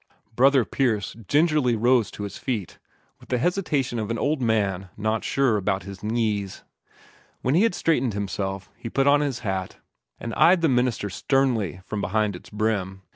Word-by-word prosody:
Brother 135 0 +5
Pierce 110 -5 -1
rose 115 -2 -14
gingerly 150 -6 +3 0.3
to 105 - -7
his 100 - -6
feet, 110 -9 -4 0.4
with - - -18
the 125 - +1
hesitation 145 -6 0
of 110 -1 -3
an 115 - -1
old 145 +3 0
man 100 -5 0
not 110 +1 -1
sure 135 -6 +2
about 95 -1 -1
his 100 0 -9
knees. 105 -3 -2 0.8
When 130 - +1
he 170 - +4
had 225 -5 +2
straightened 130 -9 +1
himself, 95 -1 -3
he 115 - -7
put 135 +4 +1
on 145 +1 +5
his 140 -5 -2
hat, 95 -2 -3 0.4
and 115 - -5
eyed 175 +7 +5
the 165 - +3
minister 125 -5 0
sternly 115 - 0
from 105 -1 -4
beneath 105 -2 0
its 90 - -12
brim. 100 -3 -2
110 Hz, 175 wpm, -24 LUFS, 100-135 Hz, 0.8 s, Brother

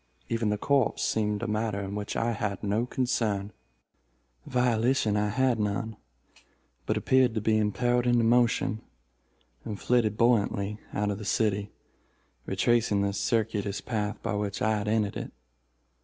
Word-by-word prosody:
Even 115 -2 0
the 105 - 0
corpse 140 +2 +1
seemed 105 0 0
a - - -1
matter 110 -1 -1
in 100 0 -5
which 105 0 -4
I 115 +1 +1
had 105 -3 -3
no 105 +4 0
concern. 110 -6 -1 1.0
Volition 125 -2 +2
I 105 0 +1
had 125 +1 +1
none, 105 +2 -2 0.9
but - - +1
appeared 130 -3 +3
to - - +1
be 110 +1 +2
impelled 120 +4 +1
into 120 -1 +3
motion, 115 -2 +2 0.8
and 105 -3 -5
flitted 115 -4 +1
buoyantly 105 -3 +1
out 105 0 -1
of 100 - -4
the - - -7
city, 105 -1 0 0.8
retracing 105 0 +2
the 100 0 0
circuitous 105 -2 -1
path 105 -3 -3
by - - -1
which 105 -1 -2
I 110 0 +1
had 105 - -4
entered 105 -2 0
it. - - -6
110 Hz, 150 wpm, -28 LUFS, 105-120 Hz, 1.0 s, appeared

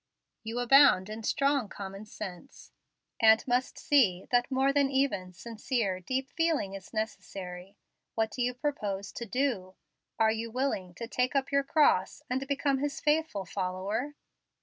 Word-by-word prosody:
You 225 +1 -5
abound 245 -6 +5
in 220 +1 -6
strong 275 0 +1
common 195 +1 -8
sense, 210 +6 -9 0.5
and 220 0 +5
must 250 +1 0
see 205 -11 +3
that 245 0 +3
more 270 +1 +2
that 285 -1 +3
even 265 -9 0
sincere, 215 0 -2
deep 260 +8 -3
feeling 320 -12 0
is 195 -1 -9
necessary. 195 -4 -6 0.4
What 220 -1 0
do 250 - -4
you 245 0 0
propose 210 -8 -3
to 235 - -6
DO? 215 -7 -1 0.4
Are 220 -1 +4
you 225 +1 -3
willing 225 -8 -2
to 230 - -6
take 250 +3 -1
up 270 0 0
your 280 0 +3
cross 275 - +2
and 265 +2 -1
become 280 -1 +1
His 285 0 -2
faithful 295 -10 0
follower?" 195 +10 -3
235 Hz, 150 wpm, -29 LUFS, 195-275 Hz, 0.5 s, abound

